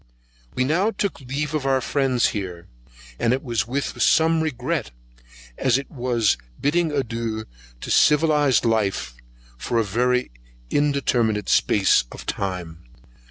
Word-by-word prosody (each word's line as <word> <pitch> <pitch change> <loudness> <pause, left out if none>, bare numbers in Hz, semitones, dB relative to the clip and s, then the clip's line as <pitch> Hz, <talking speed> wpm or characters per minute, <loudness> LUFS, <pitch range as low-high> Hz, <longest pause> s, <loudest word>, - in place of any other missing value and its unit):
We 125 - +1
now 170 +10 +2
took 200 -8 -3
leave 140 +4 -3
of 155 -3 -1
our 135 -1 +3
friends 130 -2 +1
here, 90 -4 -5 0.5
and 115 - +2
it 130 - -2
was 115 -4 -1
with 140 +4 -3
some 160 0 +4
regret, 155 - -2 0.7
as 130 -2 +3
it 135 - -7
was 120 -5 +1 0.2
bidding 160 +2 +1
adieu 115 -5 -3 0.4
to - - -5
civilized 150 -4 +4
life, 110 - 0 0.5
for 120 - -2
a 115 - +3
very 125 - 0 0.4
undetermined 125 -7 +1
space 95 - +3
of - - -10
time. 90 -4 -4
125 Hz, 130 wpm, -23 LUFS, 110-145 Hz, 0.7 s, some